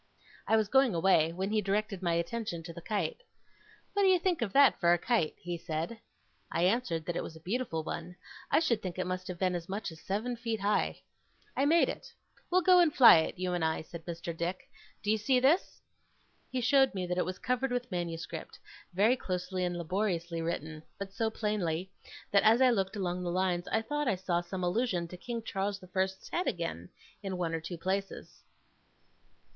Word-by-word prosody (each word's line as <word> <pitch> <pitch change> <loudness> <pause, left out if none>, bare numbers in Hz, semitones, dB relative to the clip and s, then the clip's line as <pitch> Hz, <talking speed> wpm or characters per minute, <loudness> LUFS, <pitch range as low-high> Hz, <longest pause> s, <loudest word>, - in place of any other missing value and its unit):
I 220 - +4
was 215 -2 +2
going 265 -2 +4
away, 165 -2 +4
when 190 +4 -3
he 215 0 +2
directed 205 0 -1
my 170 -2 +1
attention 170 0 -2
to 170 0 -8
the 170 - -9
kite. 200 - -2 0.7
'What 405 - +1
do 390 - +5
you 375 -1 +6
think 350 -4 0
of 220 -4 -1
that 275 +2 +5
for 170 -1 +4
a - - +3
kite?' 200 -4 0
he 175 -1 -5
said. 165 +8 -4 0.5
I 170 - 0
answered 180 -5 +1
that 175 - -3
it - - -1
was 160 - -7
a - - -11
beautiful 180 -2 -2
one. 170 +2 -5 0.3
I - - +4
should 235 -9 +1
think 185 -2 -5
it 185 - -1
must 185 +1 -4
have 180 -2 -5
been 185 0 +1
as 175 0 -5
much 200 -1 -3
as 160 - -13
seven 220 +6 -2
feet 230 -2 -3
high. 205 +1 0 0.5
'I 275 - +2
made 325 +3 +5
it. - - -6 0.4
We'll 370 +1 +3
go 365 0 +7
and 340 -3 +5
fly 245 - +9
it, 160 - -2
you 180 0 -1
and 175 -2 -1
I,' 160 0 0
said 165 0 -10
Mr. 170 -1 -5
Dick. 175 +3 -3 0.4
'Do 210 - +1
you 220 - +2
see 250 +4 +3
this?' 285 +9 +2 0.7
He 255 -1 -1
showed 265 0 +4
me 185 -1 -2
that 180 0 -1
it - - +1
was 185 0 -4
covered 250 +2 -1
with 245 0 -2
manuscript, 170 -2 -5 0.4
very 215 +6 +4
closely 185 -4 -3
and 175 -1 -1
laboriously 170 -1 -1
written; 160 -1 -4 0.2
but 195 -1 -6
so 225 +2 0
plainly, 190 -5 -2 0.4
that 200 - +5
as 225 +2 +5
I 260 -1 +6
looked 195 -3 0
along 180 -3 -2
the 180 - -2
lines, 180 0 0
I 225 - 0
thought 295 +4 -2
I 200 - +2
saw 180 -2 -1
some 180 +1 -5
allusion 180 -2 0
to 180 - -8
King 230 +5 -5
Charles 195 -1 -2
the 185 - -14
First's 190 +1 -2
head 360 - -1
again, 165 - -3 0.3
in 195 -2 -4
one 170 -2 -1
or 165 - -2
two 170 +2 -6
places. 195 +3 -4
190 Hz, 210 wpm, -31 LUFS, 175-230 Hz, 0.7 s, fly